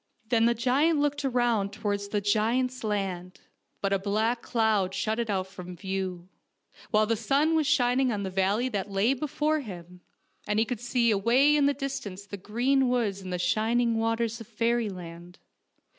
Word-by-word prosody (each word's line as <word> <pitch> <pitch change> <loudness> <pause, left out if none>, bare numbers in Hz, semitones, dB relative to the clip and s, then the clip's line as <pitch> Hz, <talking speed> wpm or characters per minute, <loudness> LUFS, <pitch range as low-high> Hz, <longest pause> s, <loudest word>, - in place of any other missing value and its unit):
Then 230 -1 +3
the 235 0 +3
giant 270 +7 +2
looked 290 0 0
around 240 -6 +1
towards 205 -1 -3
the 205 0 -1
giants' 235 +5 0
land; 190 -4 -3 0.4
but 195 0 0
a 195 - +2
black 220 +4 0
cloud 215 -5 +1
shut 220 +1 -1
it 230 -2 -2
out 190 -2 0
from 180 -1 -9
view, 190 -2 -4 0.6
while 215 0 +3
the 230 +1 +1
sun 275 +8 +1
was 310 -3 +2
shining 255 -3 +2
on 205 -2 -2
the 190 - -4
valley 195 +6 +1
that 205 -3 -3
lay 200 +6 +2
before 300 +3 -1
him, 180 - -9 0.5
and 210 - 0
he 220 - +3
could 240 -1 -4
see 240 -1 +2
away 245 +9 +4
in 285 -1 +4
the 285 - +2
distance 215 -8 -5
the 200 0 -7
green 245 +7 +1
woods 220 -6 0
and 180 -1 -4
shining 225 +6 +1
waters 225 0 -1
of 225 - -10
fairyland. 195 -7 -3
220 Hz, 175 wpm, -27 LUFS, 195-245 Hz, 0.6 s, away